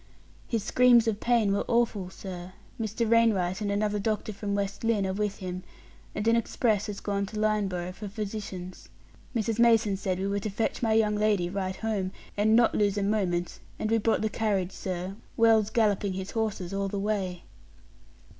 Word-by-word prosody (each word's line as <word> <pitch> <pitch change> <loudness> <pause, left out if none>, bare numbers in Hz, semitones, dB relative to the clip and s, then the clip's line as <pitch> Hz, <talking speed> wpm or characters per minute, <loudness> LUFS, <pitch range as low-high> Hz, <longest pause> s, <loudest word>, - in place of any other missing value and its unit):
"His 225 -4 -1
screams 240 0 +5
of 215 -2 0
pain 230 -5 +2
were 200 - +1
awful, 230 -6 +1
sir. 185 -1 -8 0.3
Mr. 225 +1 -1
Wainwright 215 -5 +3
and 205 -1 -1
another 210 0 0
doctor 215 +1 -2
from 200 0 -3
West 200 +1 -3
Lynne 225 -3 +2
are 190 - -1
with 205 0 -2
him, 185 -1 -5 0.5
and 210 - -2
an 230 - +5
express 220 -2 +1
has 205 -1 -5
gone 200 -1 -2
to 215 +2 -5
Lynneboro' 200 -5 0
for 210 +2 -7
physicians. 195 -3 -6 0.5
Mrs. 225 0 0
Mason 225 -3 +4
said 190 -2 -2
we 190 - -2
were 200 +1 0
to 215 - -3
fetch 210 +3 -2
my 225 -2 +2
young 220 -1 +3
lady 210 -4 +1
right 190 -1 -2
home, 200 -3 -2 0.2
and 215 +2 +3
not 235 0 +5
lose 205 -1 +1
a 200 - +1
moment; 185 -4 0 0.2
and 215 - -2
we 225 - +4
brought 220 0 +1
the 220 - +1
carriage, 200 -5 0
sir, 185 0 -4 0.2
Wells 225 -2 +5
galloping 205 -4 +1
his 190 +1 -5
horses 210 -5 -2
all 195 0 -1
the 200 - -3
way." 195 -4 -2
205 Hz, 185 wpm, -28 LUFS, 195-220 Hz, 0.5 s, screams